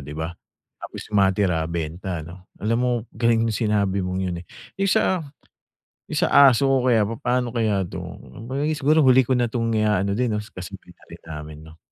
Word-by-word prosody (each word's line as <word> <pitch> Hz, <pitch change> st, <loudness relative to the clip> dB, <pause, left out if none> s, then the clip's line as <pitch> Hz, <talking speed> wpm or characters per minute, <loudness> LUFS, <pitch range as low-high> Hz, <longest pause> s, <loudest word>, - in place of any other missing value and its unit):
di 75 Hz, +2 st, -9 dB
ba? 80 Hz, +2 st, -4 dB, 0.5 s
Tapos -, -, -8 dB
matira 95 Hz, -4 st, +2 dB
benta 85 Hz, +1 st, -4 dB
'no? 90 Hz, +3 st, -13 dB
Alam 115 Hz, +2 st, 0 dB
mo 125 Hz, -, +1 dB, 0.2 s
galing 115 Hz, 0 st, +2 dB
nung 115 Hz, -, 0 dB
sinabi 105 Hz, -3 st, 0 dB
mong 90 Hz, 0 st, -2 dB
'yon, 85 Hz, -2 st, -3 dB
eh. 90 Hz, -, -14 dB, 0.3 s
Yung 195 Hz, -, +2 dB
sa, 180 Hz, -4 st, +1 dB, 0.8 s
yung -, -, -3 dB
sa -, -, +2 dB, 0.2 s
aso 135 Hz, +3 st, +1 dB
ko 130 Hz, -2 st, +2 dB
kaya 110 Hz, -3 st, +3 dB
papano 120 Hz, +2 st, -1 dB
kaya 110 Hz, -4 st, 0 dB
to? -, -, -8 dB
Kung 115 Hz, -, -11 dB
kaya 145 Hz, +3 st, -1 dB
siguro 150 Hz, +3 st, +3 dB
huli 130 Hz, -2 st, +5 dB
ko 130 Hz, -, -1 dB
na 120 Hz, -2 st, +2 dB
tong 115 Hz, -1 st, -1 dB
iaano 105 Hz, -3 st, +1 dB
din 125 Hz, +4 st, 0 dB
'no, -, -, -2 dB
kasabay 90 Hz, -2 st, -10 dB
na -, -, -23 dB
rin -, -, -12 dB
namin 75 Hz, -1 st, -8 dB
'no? 80 Hz, 0 st, -15 dB
105 Hz, 195 wpm, -23 LUFS, 90-120 Hz, 0.8 s, huli